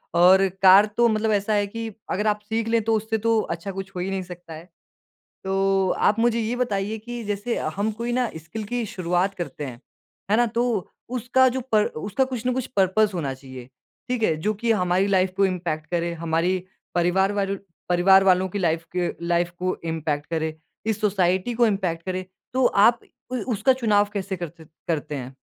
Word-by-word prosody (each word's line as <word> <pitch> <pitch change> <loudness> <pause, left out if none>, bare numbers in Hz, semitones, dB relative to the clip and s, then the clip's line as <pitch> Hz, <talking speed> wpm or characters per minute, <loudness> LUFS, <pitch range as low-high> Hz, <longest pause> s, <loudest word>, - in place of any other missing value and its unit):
और 190 +3 +6
कार 195 +2 +8
तो 240 0 +5
मतलब 215 0 +1
ऐसा 205 +1 +1
है 205 -1 +2
कि 225 +2 -5 0.2
अगर 210 +3 0
आप 210 0 +2
सीख 225 0 -1
लें, 230 0 +2
तो 225 0 +1
उससे 220 +1 -1
तो 225 0 +2
अच्छा 175 +4 -5
कुछ 195 0 -6
हो - - -3
ही 185 +2 -2
नहीं 195 -1 -2
सकता 175 -2 -10
है। 165 +3 -11 0.8
तो 195 0 +1 0.2
आप 210 - +1
मुझे 235 0 +2
ये 230 +3 -1
बताइए 215 -3 -1
कि 240 +2 -7
जैसे 205 +3 -2 0.2
हम 210 +2 0
कोई 235 +3 -3
ना 250 -1 +1
स्किल 210 +7 -7
की 240 +2 -2
शुरुआत 185 +1 -1
करते 170 -4 -5
हैं। 125 -2 -8 0.5
है 215 - +5
ना? 240 0 +4
तो 230 -3 -1 0.2
उसका 255 +1 +3
जो 260 +1 -2
पर 210 -1 +5
उसका 205 - -1
कुछ 250 -3 -5
ना 255 - +2
कुछ 255 -1 -2
पर्पज़ 200 +3 +3
होना 145 -6 -2
चाहिए, 130 -2 -11 0.4
ठीक 250 -2 -1
है? 160 -7 +2
जो 210 +7 0
कि 230 +2 +1
हमारी 185 -1 +2
लाइफ 190 -2 +2
को 195 - +4
इम्पैक्ट 170 -4 -3
करे, 170 0 -1
हमारी 165 +3 0 0.4
परिवार 185 +3 +2
वार 200 -1 0 0.3
परिवार 190 +2 +5
वालों 185 0 +4
की 205 - -4
लाइफ 165 -2 0
की 175 -1 +1 0.2
लाइफ 175 0 +1
को 185 0 -1
इम्पैक्ट 155 -2 -2
करे, 160 -1 -2 0.3
इस 220 -1 -1
सोसाइटी 190 +2 +1
को 235 0 +4
इम्पैक्ट 185 -5 -1
करे 185 0 -3 0.3
तो 255 -1 +3
आप 220 +4 +4 0.3
उ - - 0 0.2
उसका 260 +5 +3
चुनाव 210 -5 +2
कैसे 195 -1 -3
करते 170 -1 -8 0.2
करते 150 -2 -2
हैं? 130 -1 -6
195 Hz, 200 wpm, -24 LUFS, 175-220 Hz, 0.8 s, कार